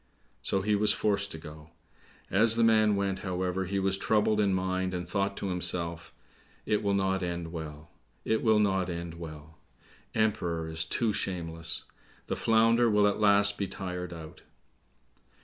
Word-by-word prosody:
So 95 -1 0
he 105 +1 +1
was 105 0 +4
forced 100 -2 0
to - - -5
go. 75 0 -11 0.6
As 110 +4 +4
the 115 - +3
man 110 -2 +4
went, 100 -1 -1
however, 95 0 -2
he 100 +2 -2
was 95 0 +1
troubled 105 0 +2
in 100 -2 +3
mind, 95 0 -1
and 90 -1 -4
thought 100 +2 -1
to 100 - -3
himself, 85 -2 -2 0.5
"It 105 0 +1
will 100 -1 +1
not 95 -1 +1
end 85 -2 -3
well; 75 -2 -8 0.3
it 110 - +1
will 110 -2 +4
not 95 -3 +1
end 85 -1 -5
well! 80 -1 -10 0.6
Emperor 90 -7 0
is 80 0 -2
too 110 +6 0
shameless! 85 -3 -3 0.4
The - - -2
Flounder 115 +1 +3
will 105 -1 +4
at 105 +1 +1
last 100 -1 +4
be 100 - -1
tired 90 -2 -5
out." 80 -2 -10
95 Hz, 165 wpm, -29 LUFS, 85-105 Hz, 0.6 s, was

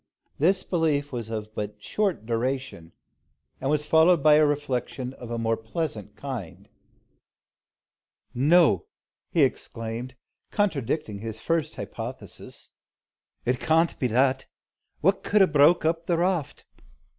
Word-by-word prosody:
This 185 +5 +3
belief 150 -5 0
was 120 -4 -5
but 110 -1 -4
of 105 - -25
short 185 - -1
duration, 120 -7 -3 0.7
and 135 - -2
was 150 0 +1
followed 160 0 +4
by 155 - +7
a 155 +1 +6
reflection 130 -3 -2
of 125 -3 -10
a 120 - -3
more 115 0 +1
pleasant 110 - -5
kind. 125 -11 -7 1.7
"No!" 165 - +4 0.4
he 165 -5 +3
exclaimed, 120 -1 -3 0.3
contradicting 150 - -1
his 110 0 -6
first 165 +3 -1
hypothesis, - - -8 0.7
"It 125 +1 +1
can't 165 +1 +2
be 125 - +1
that. 130 +3 +2 0.5
What 195 +4 +3
could 205 -1 +4
'a - - +7
broke 155 +1 +4
up 165 +1 0
the 170 - +2
raft? 175 -4 -1
140 Hz, 125 wpm, -26 LUFS, 115-165 Hz, 1.7 s, by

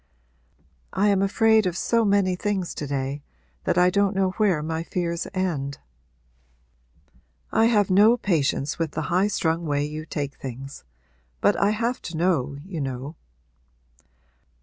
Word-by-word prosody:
'I 205 +2 +2
am 195 -1 +3
afraid 220 +1 +3
of 180 0 -2
so 230 +3 +2
many 200 -3 +2
things 190 -2 -2
to 145 - -5
day 135 +1 -3 0.4
that - - +1
I 180 0 +5
don't 200 +1 +1
know 190 -1 +2
where 190 -9 +2
my 160 +1 -2
fears 170 0 -3
end.' 155 -8 -2 1.7
'I 225 - +4
have 210 -5 +3
no 210 +5 +6
patience 150 - 0
with 165 -2 -2
the 155 +1 -3
highstrung 175 -3 +1
way 145 0 0
you 155 +1 -6
take 145 -2 -3
things. 135 +2 -8 0.6
But 205 - +3
I 200 - +2
have 230 +4 -1
to 165 -2 -6
know, 150 -6 0
you 180 -5 -5
know.' 135 +3 -5
180 Hz, 145 wpm, -24 LUFS, 150-200 Hz, 1.7 s, no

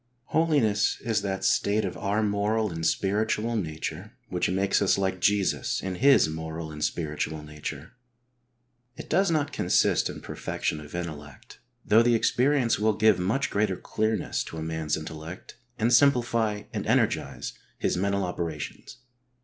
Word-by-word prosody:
H - - -6
oliness 145 -11 +2
is 110 -3 0
that 95 -1 -3
state 105 +1 +2
of 95 - -4
our 105 +2 0
moral 105 +1 0
and 80 -1 -5
spiritual 105 +6 0
nature 80 -7 -4 0.2
which - - 0
makes 95 +2 +1
us 100 - +3
like 95 -1 -1
Jesus 100 -1 +1
in 95 -1 -3
His 135 - +5
moral 80 0 -5
and 75 0 -5
spiritual 75 -1 -2
nature. 75 0 -7 1.1
It - - -9
does 195 -1 +3
not 155 -3 0
consist - - +2
in - - -7
perfection 75 - -3
of 75 +2 -10
intellect, 75 -5 -7 0.3
though 110 +2 +6
the 120 0 +4
experience 125 +1 +2
will 110 +1 +3
give 110 -4 +4
much 110 +10 0
greater 100 -3 +1
clearness 110 0 -1
to 80 - -8
a 80 - -4
man's 80 -1 -2
intellect 80 +2 -8 0.2
and 115 +3 +2
simplify 120 -5 +3
and - - -3
energise 65 -2 0 0.2
his - - 0
mental 100 +2 0
operations. 85 -4 -5
100 Hz, 150 wpm, -27 LUFS, 80-110 Hz, 1.1 s, though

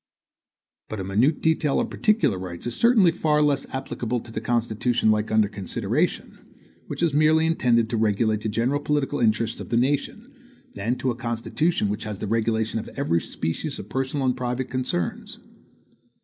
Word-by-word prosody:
But 110 - -5
a - - -3
minute 110 - +1
detail 160 -3 +2
of 240 - -2
particular 210 - +2
rights 90 -2 -7
is 120 - -2
certainly 230 -7 +5
far 155 -3 +1
less 145 -2 +1
applicable 125 -2 -3
to 115 -1 -13
a 110 - -2
Constitution 115 0 +1
like 105 0 +1
that 110 - -1
under 110 -1 +4
consideration, 100 -2 -2 0.5
which - - -4
is 165 -4 +2
merely 155 +2 +4
intended 120 -8 +2
to 115 - 0
regulate 110 0 +1
the 110 - -2
general 120 +7 0
political 145 -1 -1
interests 115 0 +1
of - - -8
the 115 - +1
nation, 135 +4 -1 0.4
than 110 +5 -1
to 130 0 -1
a - - -4
constitution 120 +5 -1
which 105 +1 -3
has 105 -2 -4
the 105 - -4
regulation 110 +1 0
of - - -7
every 85 -12 +1
species 80 - -4
of 105 - -9
personal 135 +3 -1
and 125 -1 +2
private 125 0 -3
concerns. 125 -10 -3
120 Hz, 175 wpm, -24 LUFS, 110-145 Hz, 0.5 s, certainly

